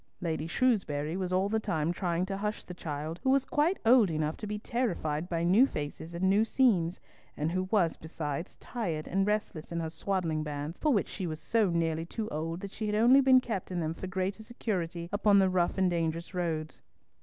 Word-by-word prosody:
Lady 160 -2 -2
Shrewsbury 170 - +1
was 185 -1 -2
all 185 +2 +2
the 220 +2 +1
time 160 -5 -1
trying 175 0 -1
to 195 0 -4
hush 210 +1 -3
the 180 - -8
child, 160 0 -5
who 265 - 0
was 270 0 +3
quite 315 +6 +1
old 230 -4 +6
enough 155 -1 -1
to 210 - -6
be 210 0 -3
terrified 180 -9 -2
by 170 -1 -1
new 200 +10 +5
faces 160 - -6
and 185 +2 +1
new 200 +3 +4
scenes, 200 -8 +2 0.4
and 150 +2 -1
who 185 +1 0
was 190 -7 +2
besides 160 0 -5
tired 175 -11 -4
and 195 +1 +1
restless 210 -7 -2
in 170 - -2
her 160 -1 -3
swaddling 165 -2 -1
bands, 150 +2 -5
for 305 - +2
which 210 -7 +2
she 190 -3 -4
was 155 -1 -4
so 220 0 +2
nearly 165 -1 0
too 220 +3 -4
old 165 +3 -3
that 200 -1 -6
she 215 0 -4
had 210 - 0
only 245 +5 +6
been 260 -1 +6
kept 220 -7 -4
in 180 -1 -2
them 160 -1 -1
for 190 - -7
greater 190 +2 -2
security 180 -7 -3
upon 205 0 +4
the 190 -1 +4
rough 180 0 +1
and 190 -1 +3
dangerous 165 +1 -2
roads. 160 -3 -3
180 Hz, 215 wpm, -30 LUFS, 160-210 Hz, 0.4 s, old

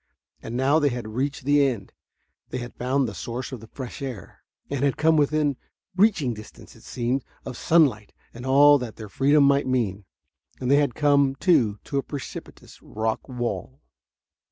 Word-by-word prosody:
And 115 +2 -5
now 140 +4 +3
they 145 -2 +2
had 120 -3 -5
reached 135 +5 -3
the 145 0 +4
end. 120 -8 -2 0.6
They 125 - -4
had 125 -1 -7
found 130 +1 0
the 110 - -6
source 120 +6 -5
of 130 - -6
the 110 - -13
fresh 130 +3 -8
air, 125 -8 -8 0.3
had 140 -1 0
come 160 +1 +3
within 150 -2 +1 0.4
reaching 185 - +3
distance, 105 -1 -13
it - - -17
seemed, 125 +2 -2 0.2
of 130 - -6
sunlight 130 -10 +2 0.2
and 120 - -9
all 145 +2 +6
that 120 -4 -6
their 110 -2 -9
freedom 140 +6 +3
might 140 -1 +3
mean. 105 -6 -1 0.5
And 125 0 -1
they 140 - +6
had 145 -5 +1
come, 140 -2 +3
too, 135 - +2
to 140 - -2
a - - 0
precipitous 140 -1 -9
rock 110 +4 -3
wall. 125 +2 -4
130 Hz, 175 wpm, -24 LUFS, 120-145 Hz, 0.6 s, all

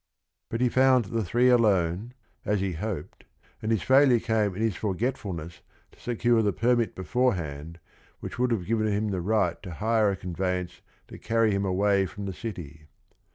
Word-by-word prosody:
But 115 - -3
he 125 - +3
found 130 -1 +4
the 115 +3 -2
three 120 +7 +2
alone, 105 -1 +2 0.3
as 105 -1 0
he 95 0 -1
hoped, 90 -2 -5 0.4
and 110 - -2
his 110 -5 +1
failure 130 -2 +5
came 110 -4 0
in 105 - -4
his 110 -5 0
forgetfulness 95 -6 -3 0.3
to - - -23
secure 120 -1 +1
the 105 -2 +1
permit 120 +2 +1
beforehand 85 - -2 0.4
which - - -7
would 125 0 +2
have 110 -7 -1
given 110 +1 0
him 105 +1 0
the 95 -3 -2
right 100 -3 0
to 90 -4 -8
hire 110 +2 +2
a 100 - -1
conveyance 90 0 -3 0.3
to - - -11
carry 115 -1 +1
him 100 0 0
away 95 +1 +2
from 100 +4 -8
the 95 - -4
city. 80 -8 -8
105 Hz, 175 wpm, -26 LUFS, 90-115 Hz, 0.4 s, failure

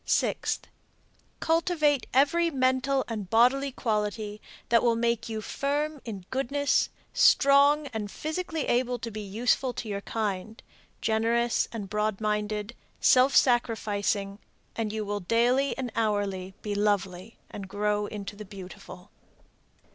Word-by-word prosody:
Sixth. - - 0 0.7
Cultivate 320 -4 +1
every 315 +6 +3
mental 260 -1 +1
and 210 -5 -5
bodily 260 +5 +3
quality 210 -3 -2 0.3
that 230 0 +5
will 235 -1 +3
make 235 -1 0
you 220 -1 -3
firm 290 +5 -2
in 200 -6 -7
goodness, 275 +2 +1 0.2
strong 280 +2 +5
and 210 -2 -3
physically 315 - -3
able 245 0 +1
to 235 -2 -6
be 215 0 -5
useful 240 +5 0
to 230 - -6
your 200 -1 -3
kind, 215 0 -3 0.4
generous 230 +2 +1
and 215 -4 -5
broad 210 0 -1
minded, 210 +1 -2 0.2
self 255 +2 +5
sacrificing, 210 -4 +1 0.4
and 220 -2 -2
you 215 0 -3
will 205 0 -2
daily 240 +8 +2
and 255 -3 -3
hourly 200 -4 -1
be 210 - -2
lovely 200 -1 -1
and 195 -1 -7
grow 210 +1 0
into 205 -1 -7
the 210 - -8
beautiful. 190 -1 -11
225 Hz, 130 wpm, -27 LUFS, 205-260 Hz, 0.7 s, that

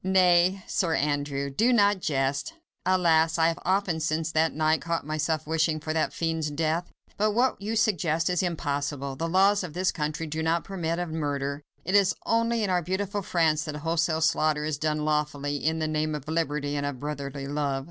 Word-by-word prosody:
"Nay! 185 0 +4
Sir 165 -4 0
Andrew, 145 -1 -1
do 225 - +2
not 205 -4 +4
jest! 140 - -1 0.3
Alas! 165 -3 +3
I 165 0 +4
have 165 - -4
often 185 -3 +1
since 160 +1 -1
last 160 +1 +2
night 155 +1 +1
caught 170 -2 -2
myself 155 +1 -1
wishing 160 0 +1
for 155 +1 -3
that 160 - 0
fiend's 160 -2 -1
death. 160 +3 -1 0.3
But 210 +1 +2
what 245 -1 +1
you 215 +3 -2
suggest 170 -7 +1
is 180 -2 +1
impossible! 145 -5 -2
The 165 +4 -3
laws 195 +3 +4
of 170 -4 -6
this 185 +1 +1
country 155 0 -3
do 155 +1 -3
not 165 +1 +1
permit 170 -4 -3
of 175 -1 -3
murder! 145 -2 -2 0.2
It 185 - -2
is 200 -2 +4
only 230 0 +1
in 205 - 0
our 180 -1 +2
beautiful 195 +4 -2
France 160 -4 +1
that 155 -2 -5
wholesale 160 +1 0
slaughter 155 -1 +2
is 150 -2 -2
done 155 -1 -1
lawfully, 145 -1 -1
in 160 +3 0
the 155 -1 -1
name 155 0 -1
of 150 -1 -7
Liberty 150 -3 -1
and 145 - -1
of 145 -3 -3
brotherly 140 -1 -5
love." 140 -1 -1
160 Hz, 195 wpm, -27 LUFS, 150-180 Hz, 0.3 s, Nay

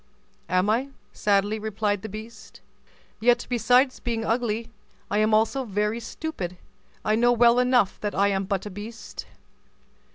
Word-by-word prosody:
"Am 185 +2 +2
I?" 240 +6 +1 0.2
sadly 205 +1 +1
replied 210 -2 -1
the 220 - -6
beast; 220 +3 -10 0.6
"yet, 240 +1 +3
besides 250 +3 +3
being 230 -2 -2
ugly, 230 -1 -1 0.4
I 205 - +2
am 215 +1 +3
also 225 +5 +2
very 210 0 -1
stupid; 230 - -5 0.5
I 215 - +2
know 240 +2 +4
well 240 0 +5
enough 250 -5 +2
that 205 -1 -3
I 200 +1 +3
am 195 -1 0
but 195 0 -2
a 210 - -6
beast." 215 +4 -8
220 Hz, 150 wpm, -25 LUFS, 205-240 Hz, 0.6 s, well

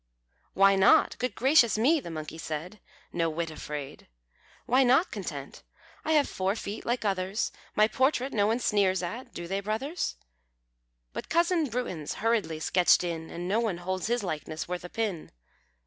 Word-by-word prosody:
"Why 195 +1 +6
not? 190 0 +5
Good 250 - -2
gracious 255 -5 +4
me!" 290 +9 +4
The 205 - -8
monkey 155 0 -6
said, 160 +7 -5 0.3
No 165 -1 +1
whit 165 +1 -3
afraid 150 -2 -7 0.6
"Why 255 +2 +4
not 265 +8 +4
content? 155 -10 -6 0.4
I 315 - +1
have 295 -2 +4
four 190 +2 -1
feet 210 -1 -6
like 240 -1 0
others, 195 +1 -1 0.2
My 215 0 +5
portrait 260 +3 +1
no 205 -2 +3
one 225 +2 +2
sneers 195 -6 +1
at 235 +8 -5
do 170 - -7
they, 195 +2 -1
brothers? 225 - -2 1.0
But - - -6
cousin 340 -1 +2
Bruins 195 -11 -3
hurriedly 215 -8 0
sketched 180 +2 +4
in, 165 -2 -4
And 175 +1 -5
no 205 +4 +2
one 220 -7 -1
holds 185 +2 -3
his 240 -1 0
likeness 155 -2 -4
worth 180 0 -4
a 180 - -7
pin." 205 -7 -3
200 Hz, 165 wpm, -28 LUFS, 175-240 Hz, 1.0 s, Why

